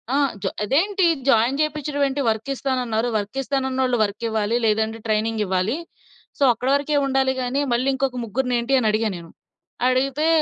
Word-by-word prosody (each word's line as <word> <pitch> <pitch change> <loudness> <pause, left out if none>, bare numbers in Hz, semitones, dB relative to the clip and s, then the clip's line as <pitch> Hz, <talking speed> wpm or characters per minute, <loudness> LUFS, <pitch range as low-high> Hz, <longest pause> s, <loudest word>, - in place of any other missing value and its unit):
ఆ! - - +3 0.3
జా 190 - +1
"అదేంటి 360 - +2 0.2
జాయిన్ 240 +2 +3
చేపించడం 300 -1 -2
ఏంటి? 275 +1 -2
వర్క్ 220 +3 -1
ఇస్తానన్నారు. 250 -4 -1
వర్క్ 210 +4 -3
ఇస్తానన్నోళ్ళు 265 -2 0
వర్క్ 210 +2 -4
ఇవ్వాలి. 220 0 0
లేదంటే 220 +1 +1
ట్రైనింగ్ 220 +1 0
ఇవ్వాలి. 190 +5 0 0.6
సో, - - 0
అక్కడ 250 +3 -3
వరకే 290 +1 0
ఉండాలి 265 -1 +1
గాని, 255 +3 -1
మళ్ళీ 245 +3 0
ఇంకొక 265 -1 -1
ముగ్గురినేంటి?" 245 +2 -1
అని 225 - 0
అడిగాను 215 -1 0
నేను. 170 -1 -11 0.6
అడిగితే 275 +4 +1
250 Hz, 155 wpm, -22 LUFS, 220-270 Hz, 0.6 s, ఆ